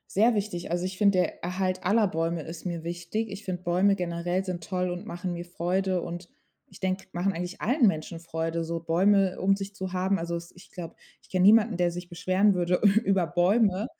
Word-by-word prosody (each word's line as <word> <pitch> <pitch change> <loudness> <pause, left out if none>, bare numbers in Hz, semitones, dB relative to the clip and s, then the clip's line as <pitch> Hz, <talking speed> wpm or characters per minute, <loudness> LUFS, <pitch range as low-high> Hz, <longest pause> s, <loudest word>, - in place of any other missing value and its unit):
Sehr 225 +4 +5
wichtig. 200 -5 -3
Also, 175 +1 0
ich 185 0 -6
finde, 200 -3 +4
der 180 - -2
Erhalt 185 +1 -2
aller 210 +1 +3
Bäume 165 -1 -1
ist 165 +2 -9
mir 170 -2 -3
wichtig. 175 +6 -3
Ich 200 +1 -8
finde, 180 -1 -4
Bäume 185 +3 +3
generell 175 0 -2
sind 175 -3 -5
toll 180 0 -1
und 180 +4 -6
machen 180 -3 -4
mir 170 0 -5
Freude 180 +1 -1
und 175 +1 -6 0.4
ich - - -16
denke, 190 0 -1
machen 180 +3 0
eigentlich 180 +2 -5
allen 250 +2 +3
Menschen 165 -2 -1
Freude, 165 0 -3
so 165 +1 -3
Bäume 185 +3 +3
um 195 +1 +4
sich 195 0 -6
zu 190 -2 -6
haben. 190 +1 +1
Also 170 +1 -3
es 170 0 -6
ich 180 - -16
glaube, 175 -3 -8 0.3
ich - - -24
kenn 185 -1 +1
niemanden, 215 +1 +6
der 175 -1 +1
sich 175 +1 -7
beschweren 185 +4 +2
würde 180 0 +1 0.2
über 195 -4 +2
Bäume. 190 +4 +2
180 Hz, 210 wpm, -27 LUFS, 175-195 Hz, 0.4 s, niemanden